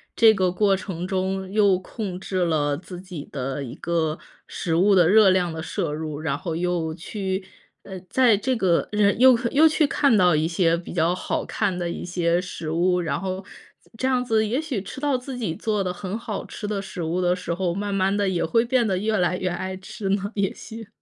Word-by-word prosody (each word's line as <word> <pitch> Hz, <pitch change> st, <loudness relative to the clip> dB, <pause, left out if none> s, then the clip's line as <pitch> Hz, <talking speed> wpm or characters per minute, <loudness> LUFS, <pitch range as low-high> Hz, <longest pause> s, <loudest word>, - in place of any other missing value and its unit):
这 225 Hz, -1 st, +7 dB
个 190 Hz, -3 st, +1 dB
过 195 Hz, +1 st, +2 dB
程 185 Hz, -2 st, -5 dB
中， 190 Hz, 0 st, -2 dB
又 200 Hz, -2 st, +4 dB
控 190 Hz, -1 st, -6 dB
制 190 Hz, 0 st, -4 dB
了 145 Hz, -3 st, +1 dB
自 180 Hz, +2 st, -9 dB
己 180 Hz, -6 st, -8 dB
的 135 Hz, 0 st, -3 dB
一 120 Hz, -, -8 dB
个 160 Hz, -2 st, -1 dB, 0.3 s
食 165 Hz, -2 st, -2 dB
物 195 Hz, +4 st, +4 dB
的 175 Hz, -3 st, +5 dB
热 210 Hz, 0 st, +7 dB
量 180 Hz, -2 st, +1 dB
的 160 Hz, 0 st, -5 dB
摄 160 Hz, -1 st, -3 dB
入， 155 Hz, -1 st, -5 dB
然 150 Hz, -3 st, -1 dB
后 165 Hz, +1 st, -4 dB
又 170 Hz, -2 st, -1 dB
去 190 Hz, +3 st, -4 dB, 0.4 s
呃， 190 Hz, -1 st, -8 dB
在 245 Hz, -5 st, +4 dB
这 260 Hz, +5 st, 0 dB
个 185 Hz, -7 st, +1 dB
人 210 Hz, 0 st, +3 dB
又 255 Hz, -1 st, +7 dB
又 310 Hz, +3 st, +6 dB
去 310 Hz, 0 st, +3 dB
看 280 Hz, -3 st, +3 dB
到 180 Hz, -3 st, +5 dB
一 155 Hz, +1 st, +1 dB
些 170 Hz, 0 st, +2 dB
比 170 Hz, -, -8 dB
较 170 Hz, 0 st, +2 dB
好 180 Hz, -, -2 dB
看 200 Hz, -4 st, -1 dB
的 175 Hz, -1 st, -2 dB
一 -, -, -5 dB
些 175 Hz, -1 st, +1 dB
食 180 Hz, -3 st, -6 dB
物。 180 Hz, +2 st, +2 dB
然 170 Hz, -, -2 dB
后， 190 Hz, 0 st, -4 dB, 0.5 s
这 260 Hz, -, 0 dB
样 255 Hz, -1 st, +2 dB
子 220 Hz, -2 st, +2 dB
也 235 Hz, +6 st, 0 dB
许 295 Hz, -10 st, -3 dB
吃 200 Hz, -, -8 dB
到 290 Hz, -1 st, +1 dB
自 250 Hz, +1 st, -7 dB
己 220 Hz, -9 st, -2 dB
做 210 Hz, +2 st, -1 dB
的 180 Hz, -1 st, -2 dB
很 185 Hz, +3 st, -5 dB
好 215 Hz, -3 st, -5 dB
吃 210 Hz, -, -6 dB
的 205 Hz, -1 st, -2 dB
食 190 Hz, -3 st, -6 dB
物 170 Hz, +3 st, -1 dB
的 180 Hz, 0 st, +2 dB
时 180 Hz, -1 st, -4 dB
候， 175 Hz, 0 st, -1 dB
慢 200 Hz, +1 st, -3 dB
慢 195 Hz, 0 st, +1 dB
地 205 Hz, -1 st, +1 dB
也 185 Hz, -3 st, 0 dB
会 230 Hz, +8 st, +2 dB
变 245 Hz, -1 st, +2 dB
得 190 Hz, -2 st, 0 dB
越 215 Hz, +3 st, 0 dB
来 180 Hz, -1 st, +1 dB
越 185 Hz, -, -2 dB
爱 185 Hz, +2 st, -4 dB
吃 195 Hz, +1 st, -6 dB
呢， 200 Hz, +1 st, 0 dB
也 200 Hz, -2 st, +1 dB
许。 225 Hz, -1 st, -10 dB
185 Hz, 240 characters per minute, -24 LUFS, 175-210 Hz, 0.5 s, 这